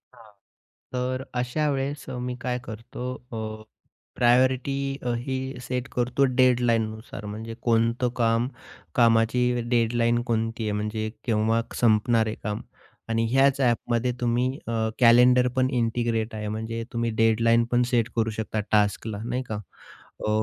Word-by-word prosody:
हां, 110 -2 -17 0.6
तर 130 +1 -2 0.2
अशा 150 +5 0
वेळेस 140 +1 -3
अ, 125 - -5
मी 125 0 -3
काय 125 0 -2
करतो 115 +2 -8 0.3
अ, 110 -1 -5 0.5
प्रायोरिटी 130 +3 +3 0.3
अ, 120 - 0
ही 135 - -2 0.3
सेट 125 +1 -3
करतो 125 +3 +2
डेडलाईननुसार 115 -4 +1
म्हणजे, 110 +2 -6
कोणतं 115 +1 +2
काम 115 0 +2 0.5
कामाची 115 +1 +4 0.3
डेडलाईन 120 0 +2
कोणती 115 0 -1
आहे 105 - -1
म्हणजे 105 +1 -2 0.2
केव्हा 115 0 +2 0.2
संपणार 115 0 +3
आहे 110 - -3
काम 105 0 -3 0.5
आणि 115 0 +1
ह्याच 135 +1 +4
ॲपमध्ये 120 0 +1
तुम्ही 120 +1 +1 0.2
अ, 115 - -2 0.3
कॅलेंडर 125 +1 +6
पण 130 0 +2
इंटिग्रेट 115 -1 -1
आहे, 105 -1 -4
म्हणजे 115 +2 -4
तुम्ही 115 -1 0
डेडलाईन 115 +1 +4
पण 125 0 +3
सेट 115 -3 +2
करू 115 -1 +1
शकता 110 0 -3
टास्कला 105 0 +1
नाही 125 +2 -2
का. 110 -3 -5 0.7
अ, - - +1
115 Hz, 140 wpm, -25 LUFS, 110-125 Hz, 0.7 s, कॅलेंडर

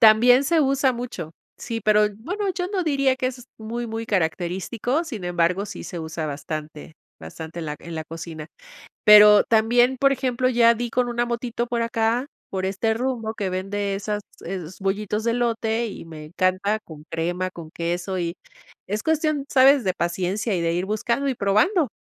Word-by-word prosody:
También 245 +4 +7
se 320 +2 +3
usa 270 -1 +2
mucho. 235 -10 -6 0.2
Sí, 230 -1 -5
pero 210 0 +4
bueno, 380 - -3
yo 360 0 -2
no 385 -2 -1
diría 275 -4 +2
que 255 - -1
es 250 -1 -6
muy, 235 +2 -4
muy 225 0 -4
característico. 190 - -1
Sin 225 - -6
embargo, 175 +3 +1
sí - - -8
se 175 - -6
usa 160 0 -4
bastante, 150 +1 -6 0.3
bastante 160 - -8
en 160 - -5
la 150 - -4
en 170 - -9
la 160 0 -4
cocina. 160 -1 -8 0.6
Pero 210 -1 +9
también, 240 +3 +3
por 275 +1 +4
ejemplo, 255 -1 0
ya 235 -1 +5
di 240 +1 -3
con 245 +1 0
una 240 0 0
motito 235 0 -3
por 235 -1 -1
acá, 230 +3 0 0.2
por 190 -1 -2
este 200 +4 0
rumbo 230 -3 -2
que 195 -2 -2
vende 195 +2 -2
esas 205 +1 -3 0.2
es 180 -1 -6
bollitos 205 +2 -1
de 235 - +2
elote 230 -1 0
y 195 - -8
me 155 -2 -9
encanta, 185 +5 0
con 155 -7 -13
crema, 175 +3 -2
con 170 -3 -10
queso 175 +3 -3
y 170 0 -2 0.5
es 210 +3 -2
cuestión, 310 -3 0
¿sabes?, 270 0 +6
de 185 -2 +1
paciencia, 185 +5 -1
y 175 - -1
de 165 0 0
ir 180 +2 -1
buscando 235 +6 -1
y 260 - -1
probando. 245 - +2
215 Hz, 185 wpm, -23 LUFS, 180-245 Hz, 0.6 s, Pero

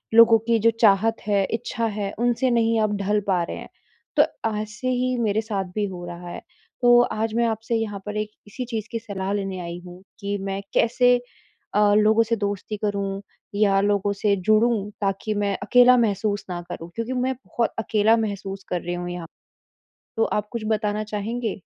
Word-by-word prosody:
लोगों 230 0 +8
की 230 -1 +3
जो 230 +2 +4
चाहत 220 +2 +4
है, 200 -1 +3
इच्छा 230 0 -2
है 205 -2 -3
उनसे 245 +2 +2
नहीं 230 -1 +2
आप 215 -1 +1
ढल 205 +2 +1
पा 180 -3 +2
रहे - - -5
हैं। - - -9 0.5
तो 295 - +8 0.4
ऐसे 215 +4 -6
ही 255 0 0
मेरे 220 -1 +1
साथ 205 -3 -3
भी 210 -1 +1
हो 180 -2 -7
रहा 175 0 -8
है, - - -7 0.4
तो 240 0 +7
आज 220 -2 -1
मैं 235 0 +3
आपसे 225 +1 -2
यहाँ 215 -3 -2
पर 210 0 -4
एक 215 0 -2 0.2
इसी 250 +5 -5
चीज़ 225 -3 -4
की 230 - -2
सलाह 200 -2 -4
लेने 195 -2 -3
आई 170 0 -6
हूँ 180 +1 -11 0.2
कि 200 -1 -2
मैं 195 0 -3
कैसे 245 +1 +4 0.6
अ, 205 0 +4
लोगों 215 +2 +5
से 230 +1 0
दोस्ती 205 0 -3
करूँ 200 -1 -1 0.4
या 200 -2 +4
लोगों 205 0 +1
से 200 0 +2
जुड़ूँ 215 +2 +2
ताकि 200 +2 -1
मैं 205 -1 0
अकेला 250 0 +6
महसूस 205 -2 0
ना 175 -1 -3
करूँ। 165 - -6
क्योंकि 230 +2 -3
मैं 255 +1 0
बहुत 235 -1 -1
अकेला 220 0 +3
महसूस 195 -2 -4
कर 180 - -1
रही 175 - -3
हूँ 175 0 -4
यहाँ, 175 -2 -6 0.9
तो 225 - +3
आप 210 0 -2
कुछ 235 -2 -3
बताना 215 0 0
चाहेंगे? 215 0 -3
210 Hz, 190 wpm, -24 LUFS, 195-230 Hz, 0.9 s, लोगों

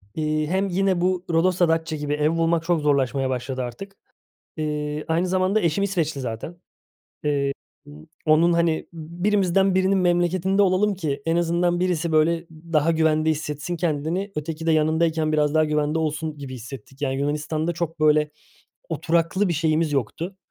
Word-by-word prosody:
iii, 155 -1 -1
hem 190 +4 0
yine 190 -1 +1
bu 180 0 0
Rodos 175 +2 +2
da 175 -2 +4
Datça 160 0 0
gibi 145 -1 -3
ev 150 +1 +2
bulmak 165 0 +1
çok 170 -1 +1
zorlaşmaya 135 -2 +1
başladı 130 0 -3
artık. 195 +12 -8 0.6
İii, 150 -1 -3
aynı 165 +3 +1
zamanda 185 +3 +1
eşim 170 +2 +1
İsveçli 165 -7 -1
zaten. 120 +7 -5 0.7
Eee, 140 -2 +1 0.3
b 145 - -13 0.3
onun, 165 +2 +4
hani, 170 -1 +1
“Birimizden 185 +3 +1
birinin 190 +1 +3
memleketinde 180 +2 +2
olalım 200 +2 +2
ki 145 -6 -3
en 165 0 +1
azından 175 +1 +1
birisi, 175 -2 0
böyle, 165 +2 +2
daha 160 0 0
güvende 160 -1 +2
hissetsin 155 +2 -3
kendini, 165 +4 -1
öteki 155 +1 -4
de - - +4
yanındayken 160 0 +2
biraz 150 -1 +2
daha 155 - +5
güvende 150 +1 0
olsun.” 155 0 -2
gibi 140 -2 -7
hissettik, 130 +2 -10
yani, 135 -2 -1
Yunanistan'da 150 +3 -1
çok, 165 -1 -4
böyle, 150 0 +3 0.6
oturaklı 170 - +1
bir - - +1
şeyimiz 160 -1 +1
yoktu. 160 - -3
160 Hz, 160 wpm, -23 LUFS, 150-175 Hz, 0.7 s, daha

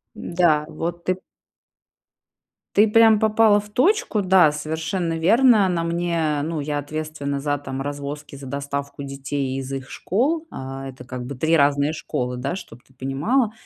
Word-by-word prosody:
Да, 170 -4 +2
вот 170 +1 -5
ты 185 0 0 1.6
ты 210 +2 +6
прям 225 0 +6
попала 215 -1 +4
в 210 0 -13
точку, 365 - +2
да, 185 -5 +5
совершенно 160 +3 -2
верно. 220 +2 +5
На 170 -2 0
мне, 170 -3 0
ну, 160 -1 -3
я 145 0 -2
ответственна 145 -1 -4
за, 145 0 0
там, 135 -1 -6
развозки, 145 0 -6
за 135 -1 -10
доставку 140 +1 -4
детей 135 -1 -3
из 135 0 -5
их 135 -1 -5
школ. 300 - 0
А 135 +1 -6
это 130 -1 -10
как 125 -1 -6
бы 140 - -5
3 160 +5 +2
разные 145 +1 +3
школы, 125 -5 -3
да, 135 +6 -3
чтоб 120 -10 -11
ты 130 - -27
понимала. 150 - 0
150 Hz, 160 wpm, -22 LUFS, 140-185 Hz, 1.6 s, ты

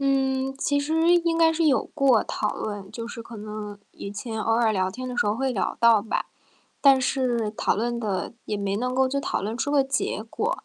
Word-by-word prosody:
嗯， 270 -1 +1
其 285 +1 +1
实 320 +4 +3
应 335 -1 +2
该 325 -1 +5
是 325 +1 0
有 275 -4 +3
过 270 -6 +4
讨 210 - -2
论， 205 -2 -5
就 230 -1 -6
是 230 0 -7
可 230 0 -10
能 210 -1 -7
以 200 - -7
前 220 +2 -5
偶 225 - +1
尔 225 -1 +3
聊 185 -2 0
天 255 +6 -6
的 250 - -5
时 - - +2
候 205 +1 +1
会 265 +1 0
聊 205 - -1
到 230 -3 +5
吧。 220 - -2 0.5
但 275 -2 +6
是 250 -4 0
讨 210 - 0
论 235 +2 -1
的， 200 -5 -2
也 210 - -2
没 200 -1 -2
能 250 +3 -2
够 265 +1 +3
就 280 +2 -1
讨 - - -2
论 210 +3 -3
出 270 +4 -2
个 285 -2 +3
结 270 -5 -1
果， 465 +4 -2
240 Hz, 240 characters per minute, -25 LUFS, 215-275 Hz, 0.5 s, 但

